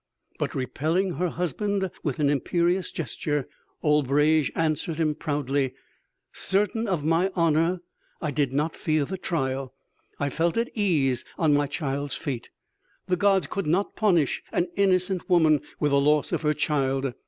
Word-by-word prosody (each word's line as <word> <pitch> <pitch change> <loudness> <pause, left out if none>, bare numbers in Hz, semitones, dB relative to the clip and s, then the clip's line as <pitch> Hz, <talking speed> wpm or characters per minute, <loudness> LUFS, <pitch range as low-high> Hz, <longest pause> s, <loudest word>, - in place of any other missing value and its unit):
'" - - -36
"But - - -2
repelling 160 +8 0
her 180 +2 0
husband 190 +4 -1
with 145 -6 -2
an 150 - +2
imperious 170 +6 +1
gesture, 150 -2 -3 0.4
Albrege 150 +1 +3
answered 160 0 0
him 155 -1 +1
proudly: 140 -3 -1 0.6
'Certain 210 +4 0
of 175 -7 -1
my 165 +4 +3
honor, 165 +1 +2 0.4
I 155 - -2
did 140 -2 0
not 150 +4 -1
fear 155 -2 0
the 190 +5 -5
trial.... 135 -6 -2 0.4
I 145 -1 -1
felt 165 - 0
at 235 +1 0
ease 155 - +1
on 155 -3 +3
my 145 0 +2
child's 140 -1 -3
fate. 130 -5 -4 0.6
The 185 - +1
gods 195 -2 +3
could 195 +4 -3
not 185 +6 +1
punish 175 - +2
an 175 0 0
innocent 185 -2 +1
woman 160 -5 +4 0.2
with 150 - +1
the 140 0 +4
loss 150 0 +2
of - - 0
her 150 -1 +1
child.... 135 -3 0
155 Hz, 155 wpm, -26 LUFS, 145-180 Hz, 0.6 s, woman